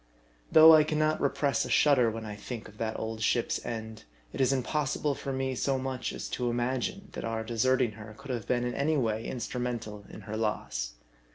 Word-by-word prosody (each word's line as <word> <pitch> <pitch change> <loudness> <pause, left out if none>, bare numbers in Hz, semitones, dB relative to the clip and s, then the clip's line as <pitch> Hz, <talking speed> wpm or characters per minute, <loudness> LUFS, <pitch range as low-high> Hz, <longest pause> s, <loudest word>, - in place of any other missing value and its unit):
Though 160 0 +10
I 155 -1 +7
can 155 0 -2
not 155 0 +1
repress 140 -2 +1
a - - -5
shudder 135 -6 +4
when 110 0 -5
I 105 -1 -6
think 110 +2 -7
of 105 - -16
that 110 -1 -2
old 110 0 -4
ship's 115 +2 +1
end, 110 -1 -6 0.3
it - - -2
is 130 - +4
impossible 145 +2 0
for 135 - -5
me 130 0 -1
so 135 +2 0
much 130 -1 -3
as - - -5
to 125 -1 -1
imagine, 130 +12 -2
that - - -6
our 115 0 -2
deserting 120 +1 +2
her 105 0 -11
could 135 -1 -7
have 120 -5 -4
been 120 -1 +1
in 125 0 -2
any 150 +2 +1
way 115 -3 -1
instru 125 0 -4
mental 110 -4 -4
in - - -10
her 105 +2 -6
loss. 85 - -2
120 Hz, 210 wpm, -29 LUFS, 110-135 Hz, 0.3 s, Though